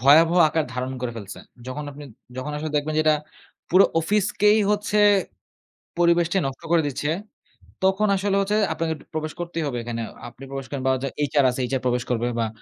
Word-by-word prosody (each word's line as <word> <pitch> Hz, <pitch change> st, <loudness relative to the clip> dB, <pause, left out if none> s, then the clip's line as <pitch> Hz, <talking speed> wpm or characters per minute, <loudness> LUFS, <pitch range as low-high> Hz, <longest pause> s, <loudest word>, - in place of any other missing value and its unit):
ভয়াবহ 160 Hz, +6 st, +6 dB
আকার 160 Hz, 0 st, 0 dB
ধারণ 130 Hz, +1 st, -3 dB
করে 125 Hz, -1 st, -3 dB
ফেলছে। 100 Hz, -3 st, -8 dB, 0.3 s
যখন 145 Hz, +4 st, -5 dB
আপনি, 145 Hz, +1 st, -10 dB, 0.3 s
যখন 130 Hz, +3 st, -4 dB
আসলে 155 Hz, +1 st, -4 dB
দেখবেন 150 Hz, +1 st, -1 dB
যে -, -, +4 dB
এটা 155 Hz, -1 st, +5 dB, 0.5 s
পুরো 185 Hz, +3 st, +7 dB, 0.2 s
অফিসেই 210 Hz, +3 st, +3 dB
হচ্ছে 210 Hz, 0 st, 0 dB, 1.0 s
পরিবেশটি 170 Hz, +1 st, +3 dB
নষ্ট 135 Hz, 0 st, -4 dB
করে 170 Hz, -1 st, +5 dB
দিচ্ছে, 145 Hz, +1 st, -2 dB, 0.8 s
তখন 190 Hz, +3 st, +3 dB
আসলে 195 Hz, +1 st, 0 dB
হচ্ছে 200 Hz, +2 st, +1 dB, 0.2 s
আপনাকে 165 Hz, -1 st, -1 dB
একটু -, -, -17 dB
প্রবেশ 155 Hz, 0 st, -3 dB
করতেই 170 Hz, -1 st, -3 dB
হবে 135 Hz, -4 st, -3 dB
একখানে। 115 Hz, 0 st, -4 dB, 0.3 s
আপনি 120 Hz, +3 st, -15 dB
প্রবেশ 135 Hz, -1 st, -5 dB
করেন 140 Hz, -2 st, -4 dB
বা 130 Hz, -, +4 dB, 0.4 s
HR 145 Hz, -1 st, +3 dB
আছে 125 Hz, -, -5 dB
HR 135 Hz, -1 st, 0 dB
প্রবেশ 125 Hz, -1 st, +1 dB
করবে 120 Hz, -1 st, 0 dB
বা 115 Hz, -, +1 dB
150 Hz, 180 wpm, -24 LUFS, 130-175 Hz, 1.0 s, পুরো